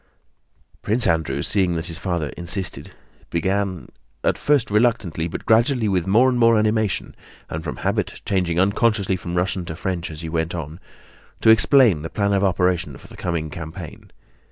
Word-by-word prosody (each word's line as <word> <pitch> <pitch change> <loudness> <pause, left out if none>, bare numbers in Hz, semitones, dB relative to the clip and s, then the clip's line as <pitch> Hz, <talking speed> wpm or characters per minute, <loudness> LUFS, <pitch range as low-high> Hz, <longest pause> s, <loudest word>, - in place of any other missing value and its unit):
Prince 115 +4 +1
Andrew, 80 -7 0
seeing 95 -4 +1
that 80 0 -3
his 85 -1 -6
father 85 -6 -2
insisted, 85 +1 -4 0.4
began—at 95 +2 -2
first 145 -7 +1
reluctantly, 105 -7 +1
but 80 - -7
gradually 115 +1 +3
with 95 -3 0
more 115 +7 +5
and 125 -1 +1
more 115 -1 +5
animation, 110 -1 0 0.4
and 80 +1 -4
from 80 - -4
habit - - -2
changing 90 -3 0
unconsciously 100 0 +2
from 90 -1 -5
Russian 90 +1 0
to 80 - -6
French 90 0 -3
as 80 0 -7
he 80 - -5
went 80 +1 -2
on—to 85 +7 -3
explain 110 - +5
the 80 - -5
plan 100 -1 0
of 100 0 +2
operation 90 -6 +1
for - - -15
the - - -12
coming 80 -3 -3
campaign. 80 +1 -8
90 Hz, 160 wpm, -22 LUFS, 85-105 Hz, 0.4 s, more